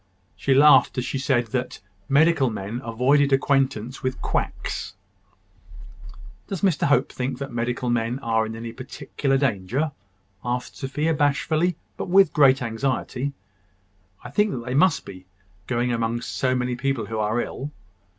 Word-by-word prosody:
She 135 - +1
laughed 145 0 +6
as 125 - -1
she 135 - -3
said, 130 -3 +1
that 125 +2 -3 0.3
medical 145 -1 +4
men 110 +3 -5
avoided 135 +5 +2
acquaintance 135 -3 +1
with 130 0 -2
quacks. - - -3 1.5
"Does 195 -4 -4
Mr 180 -9 +2
Hope 140 -2 +2
think 125 0 -3
that 140 0 -6
medical 120 +1 -2
men 120 +1 0
are 115 -4 0
in 110 - -6
any 115 0 -6
particular 135 +1 -2
danger?" 130 +3 0 0.5
asked 125 0 -3
Sophia, 150 +4 -1
bashfully, 155 +4 +1 0.2
but - - -4
with 195 -2 +5
great 135 -2 +5
anxiety. 130 +3 -2 0.9
"I 125 - -8
think 195 - 0
they 125 - -3
must 150 +2 +3
be, 95 -2 -11 0.4
going 120 0 0
among 115 0 -1
so 130 +1 -1
many 125 0 -1
people 130 -2 -1
who 110 +1 -4
are 110 +3 0
ill. 135 +3 -4
130 Hz, 145 wpm, -24 LUFS, 120-140 Hz, 1.5 s, laughed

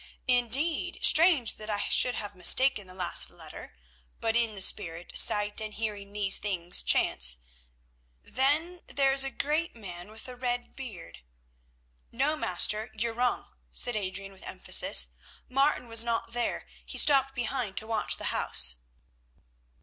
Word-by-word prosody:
"Indeed! 250 +6 0
Strange 320 -8 +5
that 215 0 -10
I 210 - -2
should 250 - +2
have 205 -1 -7
mistaken 205 +4 +4
the 185 - -14
last 180 -2 -2
letter, - - -13 0.4
but 225 0 -2
in 230 -2 +2
the 195 - -5
spirit 175 -3 0
sight 210 +1 +3
and 215 -1 -7
hearing 205 -2 -6
these 205 -2 +4
things 180 -4 0
chance: - - +2 0.9
then 310 +7 -2
there 275 -1 0
is 270 0 +6
a 270 - -3
great 305 +4 -3
man 180 -4 -10
with 220 +3 -12
a 250 - -10
red 245 -1 -5
beard." 215 - -11 0.9
"No, 275 +6 -1
Master, 215 - -1
you're 230 +1 -3
wrong," 245 +2 -3 0.2
said 245 -2 +1
Adrian 195 -1 -5
with 190 - -17
emphasis; - - +2 0.4
"Martin 270 -1 -1
was 230 0 +4
not 230 0 -4
there; 240 0 -4 0.2
he - - -7
stopped 270 -2 +3
behind 240 -4 -4
to 220 - -1
watch 220 -1 -1
the - - -10
house." 65 -1 +2
225 Hz, 150 wpm, -27 LUFS, 200-265 Hz, 0.9 s, is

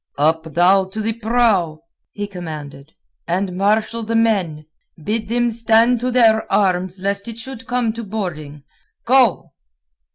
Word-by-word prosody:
"Up 160 +1 0
thou 190 +2 +4
to 190 +3 -7
the 220 +1 -1
prow," 215 -9 0 0.3
he 205 - -4
commanded, 155 -6 -9 0.3
"and 180 +1 -1
marshal 215 +4 0
the 225 +1 -3
men. 190 -10 0 0.4
Bid 215 +4 -2
them 240 0 +1
stand 230 +1 +3
to 250 +2 -1
their 225 -3 +3
arms 185 -2 +1
lest 200 +2 -2
it 230 -1 -7
should 255 +1 -9
come 245 -3 0
to 230 +1 -6
boarding. 160 -9 -6 0.4
Go!" 235 - +3
205 Hz, 140 wpm, -19 LUFS, 175-230 Hz, 0.4 s, thou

